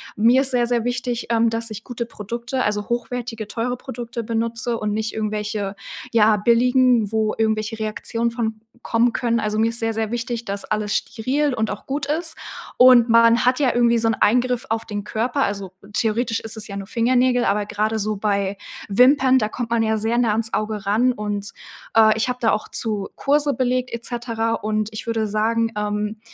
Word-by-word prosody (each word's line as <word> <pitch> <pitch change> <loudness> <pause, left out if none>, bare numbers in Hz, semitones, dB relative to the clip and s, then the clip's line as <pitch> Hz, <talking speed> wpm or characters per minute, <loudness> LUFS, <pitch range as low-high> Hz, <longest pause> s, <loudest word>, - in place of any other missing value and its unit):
mir 235 +5 +4
ist 270 0 +2
sehr, 240 -1 +2
sehr 235 -1 0
wichtig, 245 -1 -2
ähm, 230 0 +3
dass 230 0 -3
ich 215 +1 -7
gute 240 -2 -5
Produkte, 235 +4 -4
also 210 +1 -2
hochwertige, 240 -2 -3
teure 235 +3 -2
Produkte 240 -2 -6
benutze 230 +1 -2
und 210 -1 -2
nicht 220 0 -2
irgendwelche, 210 -2 -3 0.4
ja, 215 -2 +4
billigen, 240 0 +3
wo 220 0 +1
irgendwelche 220 0 -1
Reaktionen 230 +2 -2
von 220 -2 -3 0.2
kommen 235 +1 +1
können. 235 -2 0
Also, 215 0 -2
mir 225 - +3
ist 230 +1 -2
sehr, 225 0 -1
sehr 220 0 -2
wichtig, 235 0 -3
dass 200 -1 -3
alles 210 -1 -2
steril 260 +5 -1
und 220 -2 -1
auch 205 - -7
gut 280 +1 -3
ist 320 +3 -1 0.4
und 250 -2 +7
man 230 0 +5
hat 255 +3 +3
ja 265 -4 +2
irgendwie 235 -1 +3
so 225 0 +1
'n - - +2
Eingriff 250 +3 +2
auf 225 0 -1
den 205 -1 -5
Körper. 240 +6 -1
Also, 200 -2 -3 0.2
theoretisch 225 +1 0
ist 225 0 -4
es 220 - -3
ja 200 - -7
nur 195 -1 -6
Fingernägel, 245 +2 +2
aber 205 +1 +1
gerade 215 +2 -1
so 215 0 -2
bei 200 -1 -1 0.3
Wimpern, 260 +4 +5
da 215 - 0
kommt 235 +2 -5
man 230 -1 +2
ja 220 0 +1
sehr 225 +2 0
nah 235 -3 +2
ans 225 +1 0
Auge 215 0 -2
ran 230 +6 +2
und, 205 -2 -4 0.4
äh, 220 -1 +6
ich 220 - 0
habe 250 0 -3
da 225 - +3
auch 210 - -1
zu 210 -4 -2
Kurse 290 0 +2
belegt 255 -1 -1
et 235 - -5
cetera 230 -2 -2
und 215 -1 -1
ich 215 +2 -7
würde 225 -1 0
sagen, 225 +2 0
ähm, 210 +1 -2
230 Hz, 200 wpm, -21 LUFS, 215-245 Hz, 0.4 s, und